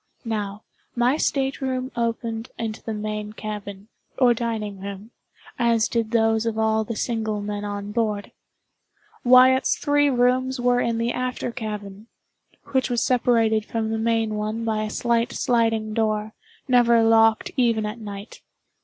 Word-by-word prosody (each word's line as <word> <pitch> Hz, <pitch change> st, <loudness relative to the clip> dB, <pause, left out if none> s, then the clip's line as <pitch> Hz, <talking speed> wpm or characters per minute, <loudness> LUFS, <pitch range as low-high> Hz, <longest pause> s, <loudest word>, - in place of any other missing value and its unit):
Now, 210 Hz, -2 st, -3 dB, 0.3 s
my 245 Hz, +3 st, +3 dB
state 270 Hz, -2 st, 0 dB
room 260 Hz, 0 st, -2 dB
opened 230 Hz, 0 st, -2 dB
into 225 Hz, -1 st, -4 dB
the 225 Hz, -, -5 dB
main 210 Hz, 0 st, -4 dB
cabin, 205 Hz, -2 st, -7 dB, 0.3 s
or 245 Hz, -2 st, +5 dB
dining 220 Hz, -4 st, -3 dB
room, 200 Hz, +3 st, -8 dB, 0.5 s
as 230 Hz, -2 st, +3 dB
did 230 Hz, -2 st, -1 dB
those 225 Hz, -1 st, +2 dB
of 225 Hz, -1 st, -2 dB
all 220 Hz, 0 st, +2 dB
the 230 Hz, +1 st, -5 dB
single 220 Hz, -2 st, -2 dB
men 205 Hz, 0 st, -4 dB
on 205 Hz, 0 st, -5 dB
board. 210 Hz, -2 st, -1 dB, 0.9 s
Wyatt's 255 Hz, +1 st, +5 dB
three 290 Hz, 0 st, +2 dB
rooms 255 Hz, +1 st, +1 dB
were 245 Hz, 0 st, +2 dB
in 235 Hz, -1 st, 0 dB
the 230 Hz, +1 st, 0 dB
after 250 Hz, -1 st, -3 dB
cabin, 210 Hz, -3 st, -6 dB, 0.6 s
which 260 Hz, -1 st, +1 dB
was 240 Hz, -1 st, +1 dB
separated 230 Hz, -3 st, +2 dB
from 220 Hz, 0 st, -3 dB
the 225 Hz, -, -1 dB
main 225 Hz, -1 st, +1 dB
one 215 Hz, +2 st, -3 dB
by 220 Hz, -1 st, 0 dB
a -, -, -4 dB
slight 235 Hz, +1 st, 0 dB
sliding 225 Hz, -3 st, +1 dB
door, 215 Hz, -1 st, -1 dB, 0.3 s
never 235 Hz, -2 st, +5 dB
locked 225 Hz, -1 st, +4 dB
even 230 Hz, -4 st, +2 dB
at 210 Hz, +3 st, -5 dB
night. 205 Hz, -1 st, -9 dB
225 Hz, 150 wpm, -23 LUFS, 215-240 Hz, 0.9 s, or